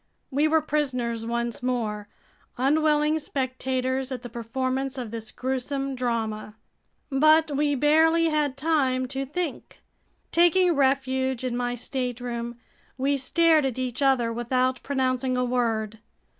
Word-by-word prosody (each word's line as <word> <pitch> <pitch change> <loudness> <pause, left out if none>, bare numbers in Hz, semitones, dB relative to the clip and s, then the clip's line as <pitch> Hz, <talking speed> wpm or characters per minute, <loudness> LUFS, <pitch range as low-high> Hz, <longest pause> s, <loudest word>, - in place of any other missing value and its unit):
We 290 +3 +2
were 320 0 +3
prisoners 250 -7 -1
once 235 0 -2
more, 220 -5 -2 0.5
unwilling 300 +3 +2
spectators 260 -1 -2
at 255 -2 -5
the 245 - -7
performance 260 +3 -3
of 240 -4 -5
this 225 -1 -5
gruesome 270 +1 -3
drama. 225 -4 -3 0.6
But 310 +2 +4
we 290 0 +1
barely 320 +4 +4
had 295 -3 0
time 270 -4 +1
to 270 0 -3
think. 330 +1 -5 0.5
Taking 350 +1 +4
refuge 265 -2 +1
in 250 -2 -2
my 245 0 -1
stateroom, 245 -1 -4 0.4
we 275 +2 +1
stared 315 +4 +3
at 265 -3 -2
each 255 0 -3
other 255 -4 +2
without 255 +2 0
pronouncing 260 -2 0
a 250 - +1
word. 225 -3 -1
260 Hz, 130 wpm, -25 LUFS, 245-285 Hz, 0.6 s, But